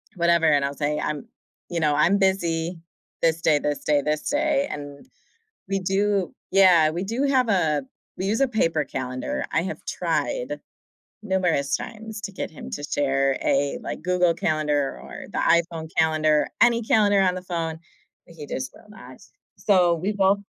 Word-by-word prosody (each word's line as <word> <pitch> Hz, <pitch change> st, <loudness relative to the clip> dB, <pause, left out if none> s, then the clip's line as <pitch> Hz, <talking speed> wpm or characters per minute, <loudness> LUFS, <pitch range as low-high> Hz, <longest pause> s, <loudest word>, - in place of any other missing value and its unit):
whatever, 170 Hz, -1 st, +3 dB
and 145 Hz, -2 st, +4 dB
I'll 140 Hz, -, -3 dB
say, 150 Hz, +1 st, -1 dB
"I'm, 150 Hz, -2 st, -3 dB, 0.4 s
you 170 Hz, -1 st, -2 dB
know, 150 Hz, -2 st, +2 dB
I'm 175 Hz, +7 st, +4 dB
busy 170 Hz, -3 st, 0 dB, 0.4 s
this 165 Hz, 0 st, +2 dB
day, 150 Hz, -3 st, +3 dB
this 145 Hz, 0 st, -2 dB
day, 145 Hz, -1 st, +3 dB
this 150 Hz, +1 st, -2 dB
day," 290 Hz, -1 st, +1 dB
and 145 Hz, -, -8 dB, 0.6 s
we 195 Hz, 0 st, 0 dB
do 195 Hz, 0 st, 0 dB, 0.2 s
Yeah, 180 Hz, -5 st, +6 dB
we 175 Hz, +4 st, -3 dB
do 235 Hz, +7 st, -2 dB
have 265 Hz, -3 st, +2 dB
a 155 Hz, -7 st, +2 dB, 0.3 s
we 190 Hz, -, -3 dB
use 220 Hz, +5 st, 0 dB
a 275 Hz, -, +4 dB
paper 165 Hz, -, +1 dB
calendar. 130 Hz, -1 st, -4 dB
I 160 Hz, -, +3 dB
have 190 Hz, -, -6 dB
tried -, -, -2 dB, 0.6 s
numerous 180 Hz, -8 st, +1 dB
times 220 Hz, -2 st, -8 dB
to 200 Hz, -, -5 dB
get -, -, -5 dB
him 155 Hz, -, -10 dB
to 145 Hz, -, -5 dB
share 135 Hz, -2 st, +1 dB
a, 140 Hz, +1 st, +1 dB
like, -, -, -6 dB
Google 180 Hz, -1 st, +2 dB
Calendar 150 Hz, -4 st, 0 dB
or -, -, -9 dB
the -, -, -2 dB
iPhone 170 Hz, -1 st, +1 dB
calendar, 155 Hz, -1 st, +3 dB
any 235 Hz, -1 st, +4 dB
calendar 205 Hz, -2 st, +3 dB
on 185 Hz, -1 st, +2 dB
the 180 Hz, -, -5 dB
phone, 165 Hz, -3 st, -3 dB, 0.5 s
but 170 Hz, -, -16 dB
he 150 Hz, -2 st, -8 dB
just 130 Hz, -1 st, -4 dB
will 210 Hz, -, -18 dB
not, 215 Hz, -, -13 dB, 0.4 s
so 180 Hz, -4 st, +4 dB
we 185 Hz, +6 st, -2 dB
both 195 Hz, 0 st, +3 dB
170 Hz, 175 wpm, -24 LUFS, 150-195 Hz, 0.6 s, Yeah